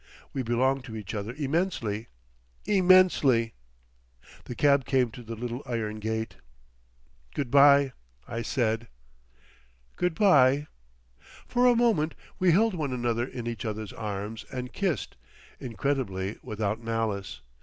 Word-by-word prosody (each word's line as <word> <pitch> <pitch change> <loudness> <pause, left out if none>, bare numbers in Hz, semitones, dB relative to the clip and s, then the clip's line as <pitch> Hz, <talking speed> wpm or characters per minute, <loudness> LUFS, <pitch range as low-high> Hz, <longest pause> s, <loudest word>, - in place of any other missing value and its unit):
We 135 - -1
belonged 130 +3 +1
to 115 -4 -8
each 105 -4 -6
other 105 +1 -3
immensely—immensely. 120 - +1 0.9
The 125 - -6
cab 140 0 +4
came 130 -4 +2
to 120 - -10
the 115 -1 -7
little 120 +3 -5
iron 110 -3 -3
gate. 110 +1 -3 1.0
"Good 130 -4 -2
bye!" 140 -1 +6 0.3
I 115 0 -4
said. 115 -1 -1 1.1
"Good 180 -2 0
bye." 145 -8 +5 0.8
For 250 0 +3
a 245 - +5
moment 220 -10 +2 0.2
we 185 -1 +4
held 220 +5 +3
one 150 -6 -2
another 120 -1 0
in 120 -3 -7
each 120 +1 -4
other's 110 -2 -4
arms 105 +1 -5
and 125 -1 -5
kissed—incredibly 115 - -3
without 105 +1 -3
malice. 115 -4 -3
120 Hz, 120 wpm, -27 LUFS, 110-145 Hz, 1.1 s, bye